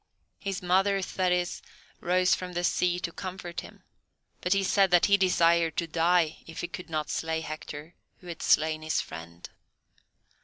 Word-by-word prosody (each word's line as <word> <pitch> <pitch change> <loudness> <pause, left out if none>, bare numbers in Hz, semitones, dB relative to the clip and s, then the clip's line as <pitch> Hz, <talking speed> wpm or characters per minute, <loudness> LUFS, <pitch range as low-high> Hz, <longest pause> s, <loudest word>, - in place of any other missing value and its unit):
His 195 -2 -4
mother, 195 +2 +3
Thetis, 180 -1 0 0.4
arose 180 +1 +3
from 180 -1 -3
the 175 0 -2
sea 175 0 +1
to 170 - -3
comfort 180 -1 -6
him, - - -14 0.6
but 180 - -2
he 195 0 +1
said 195 0 +3
that 175 -1 +5
he 200 - +5
desired 170 -4 +3
to 170 - +1
die 165 0 +2
if 165 - -7
he 175 - -3
could 180 0 -8
not 155 -2 -2
slay 160 0 -1
Hector, 155 +1 -7 0.2
who - - -20
had 170 -2 -7
slain 155 0 +3
his 155 0 0
friend. 85 +2 -8
175 Hz, 165 wpm, -28 LUFS, 160-185 Hz, 0.6 s, that